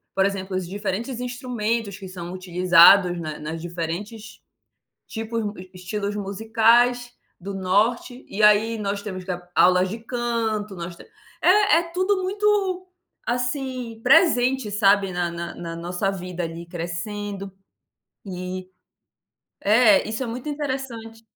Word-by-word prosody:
por 195 - +3
exemplo, 195 -1 -2
os 185 -2 -4
diferentes 205 +6 -4
instrumentos 235 -4 -2
que 195 -2 -9
são 175 -1 -7
utilizados 180 0 +5
na 155 -2 -5
nas 160 +2 -5
diferentes 175 +6 -6 0.7
tipos 225 0 -4
mu 205 0 -3
e 185 0 -11
estilos 200 +3 -4
musicais 225 +4 +2 0.3
do 195 +2 -6
Norte, 220 +7 0
e 210 - -3
aí 210 +2 +5
nós 200 -1 -3
temos 185 -3 -6
que 185 - -7
ap 175 0 -8
aulas 180 +1 +5
de 220 +5 -6
canto, 225 -3 -2
nós 170 0 -6
te - - -13 0.4
é 400 -3 +5
é - - +1
tudo 375 +1 +1
muito, 405 +3 -1 0.8
assim, 245 -1 -2
presente, 255 - +4
sabe, 200 -2 +3
na 175 -1 -1
na 170 0 -6
na 165 -1 -6
nossa 175 +3 -2
vida 180 -2 -5
ali, 165 +1 -7
crescendo. 195 +4 -5 0.7
E 185 0 -5 0.9
é, 215 0 +5
isso 220 +4 -3
é - - -2
muito 240 +5 -5
interessante. 260 -6 -5
205 Hz, 140 wpm, -23 LUFS, 185-235 Hz, 0.9 s, utilizados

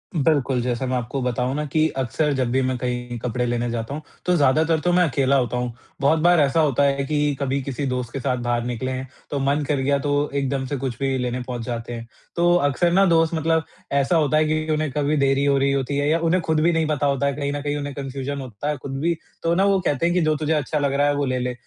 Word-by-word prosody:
बिल्कुल, 140 -5 +2
जैसा 125 +1 -2
मैं 130 0 -1
आपको 125 +3 -3
बताऊँ 125 +1 -1
न 150 - -2
कि 155 0 +3
अक्सर 145 +4 0
जब 130 -2 0
भी 130 +1 +2
मैं 130 -1 0
कहीं 125 -1 -3
कपड़े 125 +1 -2
लेने 120 0 -1
जाता 115 +3 -4
हूँ 155 - -5 0.2
तो 180 0 +3
ज़्यादातर 155 +3 +3
तो 175 +3 0
मैं 180 0 +5
अकेला 135 0 +2
होता 125 -2 +1
हूँ। 125 -1 -2 0.3
बहुत 155 +3 +3
बार 175 0 +4
ऐसा 145 +2 +3
होता 145 -3 +3
है 140 0 +2
कि 150 -1 0
कभी 140 0 -1
किसी 140 +1 -3
दोस्त 125 -2 -3
के 135 - -3
साथ 125 -1 -1
बाहर 120 -1 0
निकले 125 +2 -3
हैं 130 +1 -4 0.2
तो 140 - -1
मन 140 +2 +1
कर 150 - +1
गया 140 +1 +2
तो 145 +1 0
एकदम 135 -1 -1
से 145 - -3
कुछ 125 -3 -4
भी 135 -1 0
लेने 125 0 -2
पहुँच 125 -1 -5
जाते 120 -1 -4
हैं। 115 0 -7 0.3
तो 175 0 +3
अक्सर 170 +5 +1
न 195 +1 +5
दोस्त 165 0 +3
मतलब 160 0 +1 0.3
ऐसा 140 +5 +2
होता 155 -1 +2
है 155 - +3
कि 155 0 -1
उन्हें 155 -2 -1
कभी 150 +2 0
देरी 135 0 +2
हो 140 -1 +3
रही 140 0 +2
होती 140 +1 -1
है 145 +1 +1
या 165 +1 +2
उन्हें 170 +2 +2
ख़ुद 160 -1 +2
भी 170 +2 +4
नहीं 160 -1 +1
पता 145 -1 0
होता 140 0 +1
है, 140 - 0
कहीं 140 -1 -2
न 145 - -3
कहीं 145 0 -2
उन्हें 145 -1 -4
कन्फ़्यूजन 140 0 -4
होता 130 +3 -5
है 150 - -1
ख़ुद 135 +1 -6
भी 170 +1 +2 0.3
तो 165 0 +2
न 190 - +2
वो 195 -1 +3
कहते 145 +3 +1
हैं 175 - +2
कि 180 - +3
जो 155 -1 +2
तुझे 155 +1 0
अच्छा 150 0 -1
लग 140 -1 0
रहा 145 +1 +2
है 145 - +2
वो 145 0 0
ले 130 -1 -1
ले। 125 0 -2
140 Hz, 270 wpm, -22 LUFS, 130-155 Hz, 0.3 s, मैं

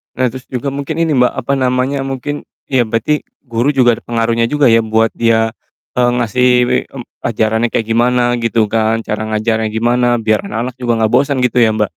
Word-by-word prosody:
nah 130 - +1
terus 130 0 -9
juga 130 +2 -3
mungkin 140 +4 -3
ini, 165 -1 +1
Mbak, 125 0 +3
apa 140 +4 -1
namanya 130 +1 0
mungkin 135 +2 -5 0.2
iya 130 -3 +2
berarti 115 +7 -1 0.2
guru 120 +2 -1
juga 120 -4 +3
ada - - -14
pengaruhnya 115 0 0
juga 145 +1 +2
ya 115 0 +5
buat 110 0 +2
dia, 115 -1 +2 0.5
eee, 120 -1 +3
ngasih, 125 +1 +1 0.5
mmm, 125 -3 -8 0.2
ajarannya 110 +1 0
kayak 115 - -1
gimana 120 +1 +2
gitu 115 -2 0
kan, 110 0 +1
cara 110 0 -3
ngajarnya 110 +1 0
gimana 120 +2 +1
biar 110 -2 0
anak-anak 115 +5 -4
juga 120 -2 -1
gak 110 - +2
bosan 135 +2 +2
gitu 125 0 0
ya, 110 -2 +4
Mbak? 105 -1 0
120 Hz, 190 wpm, -15 LUFS, 115-130 Hz, 0.5 s, ya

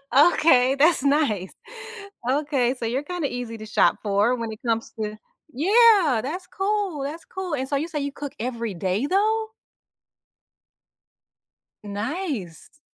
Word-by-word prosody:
Okay, 275 -4 +5
that's 300 0 +3
nice. 275 - +1 0.8
Okay, 270 -3 +1
so 230 - -3
you're 255 +5 -1
kinda 350 -3 -3
easy 245 -2 -5
to 215 - -9
shop 215 - +2
for 205 +4 +2
when 230 -2 -4
it 215 - -9
comes 230 -1 -1
to 215 0 -3 0.4
yeah, 380 - +5
that's 360 +7 -5
cool, 390 -7 -2
that's 310 +4 -6
cool, 370 -5 -4
and 265 0 -3
so 285 - 0
you 300 +4 -1
say 310 -3 -4
you 280 0 -3
cook 285 0 -7
every 235 -3 -3
day 190 +8 -1
though? 435 +5 +1 2.3
Nice. 220 - -5
275 Hz, 140 wpm, -24 LUFS, 230-335 Hz, 2.3 s, Okay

